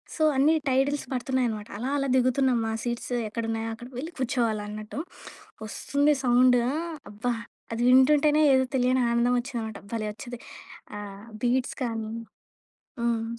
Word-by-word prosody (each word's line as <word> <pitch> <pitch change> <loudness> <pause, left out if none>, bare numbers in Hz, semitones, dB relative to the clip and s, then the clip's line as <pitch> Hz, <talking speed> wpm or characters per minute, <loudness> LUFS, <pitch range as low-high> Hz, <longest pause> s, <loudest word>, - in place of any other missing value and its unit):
So, 315 - 0
అన్నీ 300 +4 +5
titles 270 +2 +1
పడుతున్నాయన్నమాట, 245 -4 -1
అలా, 250 +5 -3
అలా 275 -1 0
దిగుతున్నాం. 255 0 +3
మా - - -1
సీట్స్ 240 +1 -3 0.2
ఎక్కడున్నాయో 225 0 -2
అక్కడికి 245 +3 -12
వెళ్లి 320 +6 -6
కూర్చోవాలన్నట్టు. 215 -3 -2 0.7
వస్తుంది 285 +7 +1
సౌండు 250 0 +5 0.5
అబ్బా! 225 +4 -1 0.4
అది 230 - -2
వింటుంటేనే 295 +4 +5
ఏదో 260 0 +4
తెలియని 255 0 +3
ఆనందమచ్చిందన్నమాట. 235 -2 0
భలే 220 -2 -1
వచ్చిద్ది. 240 +2 -8 0.6
ఆహ్, 200 0 -9 0.2
బీట్స్ 245 +1 +1
కానీ 225 -2 -3 0.9
హ్మ్. 230 -1 0
245 Hz, 120 wpm, -27 LUFS, 225-265 Hz, 0.9 s, అన్నీ